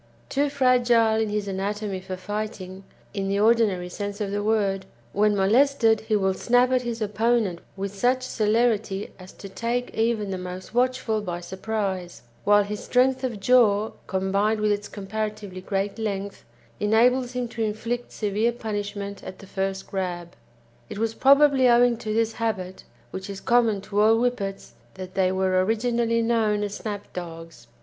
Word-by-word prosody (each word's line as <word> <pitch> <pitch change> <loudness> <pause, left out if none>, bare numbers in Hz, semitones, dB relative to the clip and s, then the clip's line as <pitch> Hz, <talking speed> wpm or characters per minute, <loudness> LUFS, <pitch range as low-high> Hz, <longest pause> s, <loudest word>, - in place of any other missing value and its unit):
Too 285 +1 +1
fragile 245 -5 +3
in 220 - 0
his 210 -1 -2
anatomy 200 +1 -3
for 185 0 -6
fighting, 195 -1 -5 0.3
in 195 -1 -2
the 200 +1 0
ordinary 215 -5 +3
sense 205 +3 -5
of 205 -2 -2
the 205 0 -1
word, 200 -3 0 0.3
when 210 +1 +3
molested, 225 +3 +3
he 215 - +2
will 190 -2 +2
"snap" 245 +5 +2
at 255 -1 +3
his 235 -2 -3
opponent 215 -3 +1 0.2
with 195 0 -4
such 250 +5 +1
celerity 220 -3 0
as 185 0 -11
to 200 - -10
take 235 +5 -3
even 220 -3 0
the 190 - -3
most 180 +2 -7
watchful 245 -3 +1
by 175 -4 -4
surprise; 190 - -4 0.2
while 205 0 +5
his 210 +1 -5
strength 260 +1 +2
of 240 -5 -2
jaw, 220 -2 +4 0.2
combined 195 +3 0
with 210 0 +2
its 205 0 -2
comparatively 210 -1 -5
great 195 +3 -2
length, 200 -2 -4 0.3
enables 245 +4 +3
him 250 -1 -2
to 230 - -6
inflict 230 +3 -3
severe 215 +2 0
punishment 205 -3 -5
at 185 - -8
the - - -13
first 195 0 -3
grab. 175 -3 -4 0.5
It - - -7
was 225 +1 -1
probably 275 0 +5
owing 240 0 +5
to 220 -1 -5
this 225 +1 +1
habit, 190 -5 -3 0.3
which 190 +2 -6
is 195 -1 -6
common 230 -4 +2
to 205 +1 -1
all 220 +1 +5
Whippets, 230 - -2 0.2
that 185 -1 -8
they 185 -1 +2
were 185 -1 +2
originally 230 +2 +1
known 220 -3 +1
as 205 -1 -3
Snap 205 -1 -6
Dogs. 165 -7 -8
210 Hz, 165 wpm, -25 LUFS, 195-230 Hz, 0.5 s, while